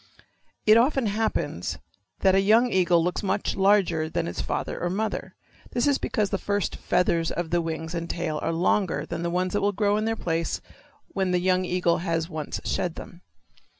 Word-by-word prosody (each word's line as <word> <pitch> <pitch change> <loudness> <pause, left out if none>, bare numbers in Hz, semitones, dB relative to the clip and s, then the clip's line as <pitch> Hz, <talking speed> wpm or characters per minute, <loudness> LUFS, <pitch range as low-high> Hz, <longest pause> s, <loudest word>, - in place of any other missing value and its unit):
It 215 +1 +7
often 265 +1 +3
happens 215 +1 -1 0.4
that 190 -1 +5
a 195 - +4
young 225 +5 +4
eagle 175 -2 +3
looks 180 +1 -1
much 195 0 -1
larger 190 -5 +3
than 155 - -2
its 85 -7 -4
father - - -3
or 175 - 0
mother. 215 +4 -3 0.4
This 240 - +1
is 285 -1 +2
because 210 -3 -1
the 195 - 0
first 205 -1 -1
feathers 165 -2 +1
of 170 -2 -3
the 175 0 +2
wings 160 0 -4
and 170 -1 -4
tail 160 -3 -2
are - - -1
longer 180 +2 +1
than - - -5
the 170 - -1
ones 180 +1 -1
that 205 - +1
grow 205 0 +2
in 215 - -1
their 225 0 0
place 165 -4 -2 0.5
when 190 -2 -1
the 180 0 +2
young 185 +1 +2
eagle 180 -1 +1
has 165 -2 -1
once 155 -4 -5
shed 175 -2 -1
them. 175 - -10
180 Hz, 190 wpm, -26 LUFS, 170-205 Hz, 0.5 s, It